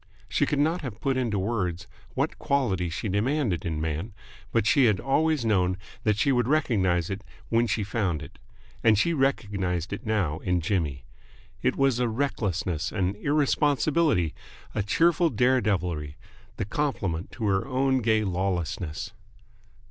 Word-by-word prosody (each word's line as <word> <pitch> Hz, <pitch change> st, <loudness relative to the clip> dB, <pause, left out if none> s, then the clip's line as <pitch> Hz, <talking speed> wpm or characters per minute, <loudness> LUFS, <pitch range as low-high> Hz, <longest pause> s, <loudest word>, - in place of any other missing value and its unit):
She 145 Hz, -, +1 dB
could 145 Hz, -, 0 dB
not 160 Hz, +5 st, +1 dB
have 120 Hz, -7 st, -6 dB
put 135 Hz, -1 st, 0 dB
into 120 Hz, -5 st, 0 dB
words 95 Hz, -4 st, -1 dB, 0.3 s
what -, -, -1 dB
quality 100 Hz, -11 st, 0 dB
she 85 Hz, +6 st, -3 dB
demanded 105 Hz, -, 0 dB
in 80 Hz, -2 st, -2 dB
man, 80 Hz, +7 st, -3 dB, 0.4 s
but -, -, +2 dB
she 135 Hz, +3 st, +5 dB
had 105 Hz, -5 st, +3 dB
always 150 Hz, -1 st, +1 dB
known 95 Hz, -4 st, +2 dB, 0.3 s
that 105 Hz, -2 st, +3 dB
she 140 Hz, -, +3 dB
would 125 Hz, -2 st, +2 dB
recognise 100 Hz, -, +1 dB
it 100 Hz, +1 st, -4 dB, 0.3 s
when 115 Hz, +1 st, +3 dB
she 110 Hz, -, 0 dB
found 100 Hz, -6 st, -1 dB
it: -, -, -13 dB, 0.4 s
and 110 Hz, -2 st, +5 dB
she 170 Hz, +11 st, +2 dB
recognised 100 Hz, -, 0 dB
it 100 Hz, -, -5 dB
now 95 Hz, -8 st, 0 dB
in 90 Hz, -2 st, 0 dB
Jimmy. 80 Hz, -6 st, -1 dB, 0.6 s
It 125 Hz, -, +1 dB
was 135 Hz, -3 st, +2 dB
a 125 Hz, -1 st, +1 dB
recklessness, 95 Hz, -, -1 dB
an 95 Hz, -2 st, 0 dB
irresponsibility, 145 Hz, -, +2 dB, 0.4 s
a 110 Hz, -, 0 dB
cheerful 165 Hz, -, +3 dB
dare 130 Hz, -2 st, +3 dB
devilry, 90 Hz, -8 st, -1 dB, 0.4 s
the -, -, -2 dB
complement 100 Hz, -, -2 dB
to 115 Hz, -2 st, -4 dB
her 95 Hz, +1 st, +1 dB
own 130 Hz, 0 st, +2 dB
gay 110 Hz, -2 st, +2 dB
lawlessness. 90 Hz, -4 st, -2 dB
105 Hz, 155 wpm, -27 LUFS, 90-135 Hz, 0.6 s, she